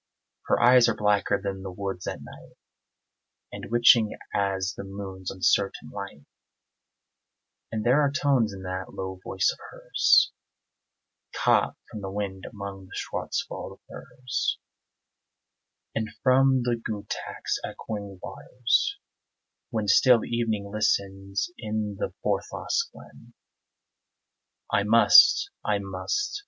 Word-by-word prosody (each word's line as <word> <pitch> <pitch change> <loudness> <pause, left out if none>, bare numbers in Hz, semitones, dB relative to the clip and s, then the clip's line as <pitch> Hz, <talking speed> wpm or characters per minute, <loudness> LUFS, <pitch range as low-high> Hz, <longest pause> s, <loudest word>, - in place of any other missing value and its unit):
Her - - +2
eyes 120 0 +6
are 115 - 0
blacker 105 -1 +1
than 100 -1 -4
the 95 - -6
woods 95 -1 -5
at - - -5
night - - -14 1.0
And - - -8
witching 120 -2 +5 0.2
as 100 -1 0
the - - -7
moon's 95 -1 -7
uncertain 95 +1 0
light; 100 -8 -8 1.5
And 110 0 -3
there 130 +5 +4
are 145 - +3
tones 135 -6 +2
in 95 -1 -9
that 95 0 -5
low 95 -1 -5
voice 95 -1 +1
of - - -17
hers - - +3 1.0
Caught - - +2
from 105 - -7
the 95 - -5
wind 95 -1 -4
among 100 -3 -8
the - - -11
Schwarzwald - - -4
firs, 125 -1 -3 1.4
And 110 -1 -2
from 130 0 +4
the 120 -1 -1
Gutach's 105 -2 -4
echoing 100 -3 -6
waters, 125 - 0 0.7
when 110 -4 -2
Still 120 +3 +5
evening 110 -4 -2
listens 100 - -1
in 105 -2 -3
the - - -2
Forsthaus 460 0 -1
glen. - - -16 1.4
I - - +4
must 400 - +6
I 105 -1 +1
must! 100 - -3
105 Hz, 120 wpm, -26 LUFS, 95-120 Hz, 1.5 s, eyes